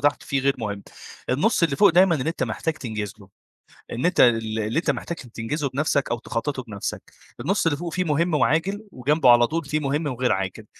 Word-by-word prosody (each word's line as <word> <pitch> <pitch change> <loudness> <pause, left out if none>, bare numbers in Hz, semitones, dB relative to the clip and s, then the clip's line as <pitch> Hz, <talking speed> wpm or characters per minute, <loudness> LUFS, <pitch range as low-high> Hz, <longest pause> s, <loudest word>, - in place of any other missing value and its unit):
تحت 145 0 +1
فيه 135 -1 -1
غير 140 +1 +2
مهم، 100 -3 -4 0.5
النُص 170 - +2
اللي 145 -5 +2
فوق 205 - +6
دايمًا 180 0 +5
إن 135 -1 -2
أنت 165 - -2
محتاج 160 -1 -2
تنجز 110 -5 -5
له، 100 -2 -16 0.6
إن 125 +7 -2
أنت 180 - +1
ال 115 -2 +3
اللي 110 +8 0
أنت - - +1
محتاج 170 - -5
تنجزه 125 +5 -4
بنفسك، 140 0 0
أو 120 - -1
تخططه 130 +3 -3
بنفسك، 105 -4 -5 0.4
النُص 195 -1 0
اللي 145 -3 +2
فوق 170 0 -5
فيه 185 - 0
مهم 165 +2 0
وعاجل، 165 +9 +1
وجنبه 135 +1 +2
على 120 0 +7
طول 165 0 -3
فيه 155 +2 -1
مهم 145 +2 -1
وغير 125 -1 0
عاجل، 95 +3 -2
140 Hz, 205 wpm, -24 LUFS, 115-165 Hz, 0.6 s, على